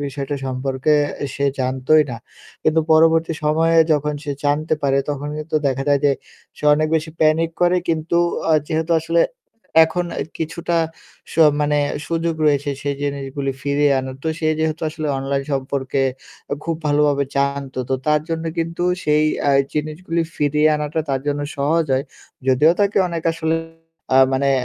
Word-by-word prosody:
বিষয়টা 140 +1 -4
সম্পর্কে 130 +2 -1 0.4
সে 140 - -1 0.2
জানতোই 130 +4 +3
না। 120 - -4 0.5
কিন্তু 155 +1 +3
পরবর্তী 165 +1 +4
সময়ে 165 +2 +2 0.2
যখন 150 0 0
সে 145 - -2
জানতে 150 +2 +1
পারে 135 -1 +2
তখন 145 0 -4
কিন্তু 155 +1 -2
দেখা 135 0 0
যায় 140 -1 +3
যে 145 - +5 0.5
সে - - -7
অনেক 155 +1 0
বেশি 160 0 -1
প্যানিক 160 +1 +3
করে 175 +1 +4
কিন্তু 165 +1 0 0.3
অ - - +5 0.2
যেহেতু 160 +1 -1
আসলে 165 +1 +1 0.6
এখন 175 +2 -2
অ্যা - - -2 0.2
কিছুটা 170 +1 -2 0.6
স - - -9 0.3
মানে 150 0 +2 0.3
সুযোগ 165 0 -1
রয়েছে 145 -1 +2
সেই 145 0 -1
জিনিসগুলি 140 -1 -3
ফিরিয়ে 145 0 +2
আনার। 130 0 -5
তো - - 0
সে 155 - 0
যেহেতু 160 0 -1
আসলে 155 0 -5
অনলাইন 135 +1 -1
সম্পর্কে 135 0 -1 0.6
খুব 165 -1 -1
ভালো 145 0 +2
ভাবে 140 -1 +1
জানত। 140 -1 -1 0.2
তো - - +3
তার 150 0 +3
জন্য 165 0 -3
কিন্তু 165 +1 -2 0.2
সেই 150 0 +3 0.2
অ্যা 140 - +3 0.2
জিনিসগুলো 155 +3 -2 0.2
ফিরিয়ে 150 +1 +2
আনাটা 150 +1 -2
তার 135 -1 0
জন্য 145 0 0 0.2
সহজ 155 +4 +1
হয়। 130 +1 +1 0.4
যদিও 145 +5 +5
তাকে 200 0 +2
অনেক 170 -2 -4
আসলে 160 0 -1 0.6
আ - - +6 0.2
মানে 140 +1 +2
150 Hz, 160 wpm, -20 LUFS, 140-160 Hz, 0.6 s, আ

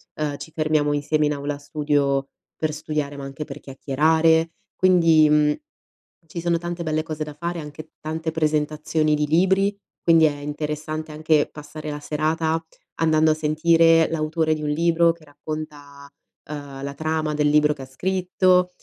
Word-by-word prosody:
ehm, 150 -2 -2
ci 160 - -10
fermiamo 155 -2 +1
insieme 150 +1 +1
in 150 - 0
aula 145 0 -4
studio 145 -2 0 0.3
per 155 -1 -2
studiare, 150 -2 -3
ma 140 - -7
anche 135 +2 -6
per - - -9
chiacchierare. 160 +4 +2 0.2
Quindi, 165 -4 +5
uhm, 150 0 +3 0.7
ci 170 +2 -6
sono 170 0 +1
tante 175 0 -5
belle 155 -1 -1
cose 155 -1 -4
da 150 -1 -8
fare, 170 +3 -4
anche 150 +1 -10
tante 160 +1 -3
presentazioni 155 0 0
di 150 0 0
libri, 190 +5 +2 0.3
quindi 165 -1 +5
è 150 -2 +1
interessante 150 +2 -4
anche 155 -1 +2
passare 150 +1 -8
la 145 0 -4
serata 160 +2 -1 0.3
andando 160 -1 +3
a - - +4
sentire 165 +1 +4
l'autore 155 0 0
di 155 - -4
un 150 - -1
libro 170 +2 +3
che 165 -2 -13
racconta, 145 -1 -8 0.4
ehm, 145 -2 -8
la 140 0 -4
trama 155 0 -2
del 150 0 +2
libro 150 0 +4
che 140 - -12
ha - - -8
scritto 180 +4 +1
155 Hz, 165 wpm, -23 LUFS, 150-160 Hz, 0.7 s, Quindi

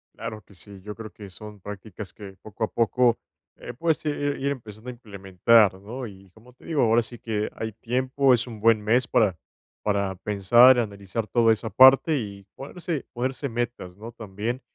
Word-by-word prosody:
Claro 110 -1 -7
que 100 +1 -21
sí, 100 +1 -12
yo 105 +2 -8
creo 110 -3 -9
que 100 +2 -11
son 105 +2 -11
prácticas 105 0 -9
que 100 -2 -11
poco 110 +1 -7
a - - +2
poco, 120 +1 +2 0.4
eh, 120 - -8
puedes 160 +4 -1
ir 150 -1 0 0.2
ir 140 +1 -1
empezando 115 -3 -8
a - - -3
implementar, 100 -2 +2
¿no? 120 +5 -7
Y, 95 -1 -14
como 115 +5 -19
te 125 - -21
digo, 155 -4 0
ahora 115 +1 +4
sí 120 +1 -11
que 105 -2 -2
hay 110 0 -4
tiempo, 130 +4 +1
es 120 +1 0
un 110 -3 -9
buen 110 0 +4
mes 120 +4 +2
para 100 -7 +2 0.4
para 100 -2 0
pensar, 105 +7 +5
analizar 100 -1 -3
toda 115 -1 +4
esa 110 +1 -5
parte, 130 - +6
y 100 -5 -6
ponerse 160 +1 -5
ponerse 130 +3 -3
metas, 115 -6 -4
¿no?, 115 +3 -9
también. 115 +3 -5
110 Hz, 185 wpm, -25 LUFS, 100-125 Hz, 0.4 s, parte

